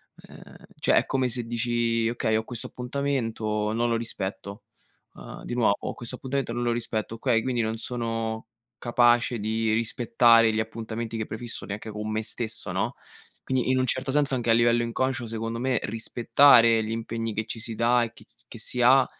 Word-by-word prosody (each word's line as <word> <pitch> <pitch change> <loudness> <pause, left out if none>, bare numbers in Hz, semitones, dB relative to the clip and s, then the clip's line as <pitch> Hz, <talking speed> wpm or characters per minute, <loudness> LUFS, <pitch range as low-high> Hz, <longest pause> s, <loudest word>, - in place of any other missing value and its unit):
ehm, - - -15 0.2
cioè - - +1
è - - +3
come 130 -1 0
se 120 0 0
dici: 115 -1 0
"Okay, 115 -2 0
ho 110 - 0
questo 120 0 -2
appuntamento, 115 -5 -2
non 120 +1 0
lo 115 - +1
rispetto", 100 -3 -5 0.5
uhm, - - -10
di 120 - -5
nuovo 110 -4 +1
"Questo 120 +1 -6
appuntamento 130 -2 -3
non 120 - -3
lo 120 0 +1
rispetto"; 115 -1 -3
okay, 115 -1 +1
quindi 125 0 -1
non 110 0 -2
sono 115 -2 -3 0.3
capace 120 0 +2
di 110 +1 0
rispettare 115 0 +4
gli 110 - 0
appuntamenti 115 +1 -4
che 110 - -2
prefisso 115 +2 -4
neanche 105 +2 -6
con 105 0 -5
me 110 0 -1
stesso, 110 0 -3
no, - - -1 0.5
quindi, 130 -1 -1
in 130 - +2
un 130 - +2
certo 130 +2 0
senso, 140 -1 +2
anche 120 -2 -2
a - - +6
livello 120 0 +3
inconscio, 120 +1 -1
secondo 115 +1 -4
me, 125 -1 0
rispettare 115 +1 +4
gli 110 - -4
impegni 115 0 -3
che 110 +1 -2
ci 115 - -5
si 115 +1 -3
dà 120 +2 +3
e 115 -1 -5
che 130 - -16
c - - -41
che 115 - -10
si 125 +2 0
ha, 130 +2 +6
115 Hz, 190 wpm, -26 LUFS, 110-120 Hz, 0.5 s, a